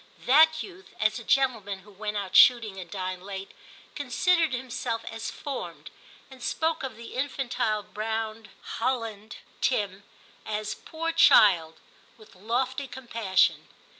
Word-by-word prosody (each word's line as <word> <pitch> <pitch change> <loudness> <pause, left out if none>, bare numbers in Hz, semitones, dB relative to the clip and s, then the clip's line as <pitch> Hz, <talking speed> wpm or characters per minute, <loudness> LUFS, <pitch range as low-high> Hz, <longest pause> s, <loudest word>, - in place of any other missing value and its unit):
That 315 +4 +5
youth, 390 +1 -13
as - - +1
a - - -10
gentleman 225 -8 +1
who 205 +2 -17
went 210 +1 -4
out 195 -2 -4
shooting 225 -6 +6
and 180 -2 -8
dined 185 -1 -4
late, 195 0 -7 0.4
considered 320 +4 +1
himself 245 -2 -3
as 225 0 -5
formed, 280 -2 -7 0.4
and 260 -1 -13
spoke 320 +5 -1
of 260 -4 -5
the 235 0 -10
infantile 255 -5 -1
brown 220 0 -4 0.3
hoUand 225 -3 -2 0.3
Tim 205 -5 0 0.4
as 215 0 -3
* - - -28
poor 330 +1 -2
child 185 - +5 0.2
' - - -29
with 215 -1 -17
lofty 255 +7 -2
com 265 0 -10
passion. 195 -5 +2
225 Hz, 140 wpm, -27 LUFS, 205-265 Hz, 0.4 s, shooting